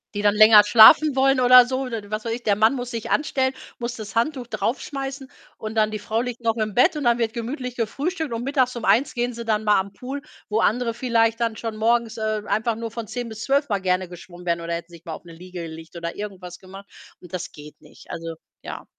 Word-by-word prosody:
Die 205 - -2
dann 205 0 +3
länger 215 -1 +8
schlafen 240 +7 +7
wollen 270 0 +3
oder 250 0 +8
so, 260 +1 -2
oder 240 -4 -4
was 215 0 -3
weiß 230 - -3
ich. 240 - -6
Der 205 -2 +2
Mann 220 +6 +3
muss 245 0 -5
sich 230 -2 -5
anstellen, 265 -3 0 0.3
muss 240 +1 -4
das 215 -1 -9
Handtuch 255 +1 0
draufschmeißen, 270 +2 -4 0.3
und 215 0 -6
dann 215 -1 +3
die 215 - -4
Frau 220 +2 -2
liegt 245 -1 -5
noch 225 -1 0
im 215 -2 -2
Bett, 305 +6 +4
und 295 - -3
dann 240 0 +3
wird 225 -2 -1
gemütlich 250 +1 -5
gefrühstückt 290 - -3
und 230 +1 -3
mittags 260 -2 0
um 235 - -5
13:00 235 +7 +2
gehen 245 +1 -1
sie 235 0 -7
dann 215 -1 0
mal 210 -2 +4
an 195 +1 -4
Pool, 270 +3 -6 0.3
wo 220 +1 0
andere 230 +1 +1
vielleicht 230 -2 +1
dann 230 -2 -1
schon 225 0 -5
morgens, 230 0 +1
äh, 215 -1 -2
einfach 220 +3 0
nur 230 -1 -6
von 225 -2 -6
10:00 245 -1 -5
bis 220 -1 -8
12:00 280 0 +1
mal 200 -2 -1
gerne 185 0 0
geschwommen 175 0 -12
wären 170 0 0
oder 170 0 -4
hätten 170 +1 -6
sich 170 0 -14
mal 165 - -5
auf 175 - -10
'ne 170 - -12
Liege 180 +1 -9
gelegt 160 +1 -10
oder 170 0 -5
irgendwas 190 -4 -8
gemacht 195 +1 -13 0.3
und 180 -1 -16
das 180 +1 -5
geht 150 0 -14
nicht. - - -15
Also 165 -1 -6 0.3
ja. - - -8
225 Hz, 245 wpm, -23 LUFS, 200-245 Hz, 0.3 s, länger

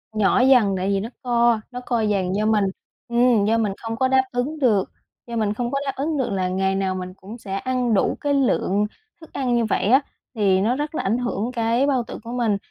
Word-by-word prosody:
nhỏ 215 +2 +3
dần, 250 -6 +5
tại 185 +1 -1
vì 195 -1 +1
nó 220 - -5
co, 235 -2 +3
nó 250 - -5
co 240 -2 0
dần, 195 -3 0
do 215 - 0
mình 215 -2 +3 0.4
ừm 235 -3 +3
do 225 +2 +2
mình 210 -4 0
không 225 0 -3
có 260 +3 +1
đáp 260 0 +3
ứng 260 +6 -2
được 215 -8 +2 0.4
do 235 - -5
mình 210 -2 0
không 240 +2 -3
có 275 - 0
đáp 275 - 0
ứng 295 +2 -2
được 260 - -1
là 185 -2 -1
ngày 190 +1 0
nào 190 -1 -1
mình 185 0 -6
cũng 200 +5 -11
sẽ 195 -4 -6
ăn 250 +1 -1
đủ 195 - +1
cái 290 -1 0
lượng 210 -7 +1 0.4
thức 320 - -15
ăn 250 -3 0
như 235 - +2
vậy 210 - 0
á. 260 +6 +5 0.3
Thì 195 -3 +2
nó 230 +5 +1
rất 295 +3 -4
là - - -2
ảnh 215 +5 +1
hưởng 240 -2 -2
cái 235 +3 +1
bao 260 -4 +1
tử - - -8
của 235 - -7
mình 235 -5 0
230 Hz, 245 wpm, -22 LUFS, 200-250 Hz, 0.4 s, dần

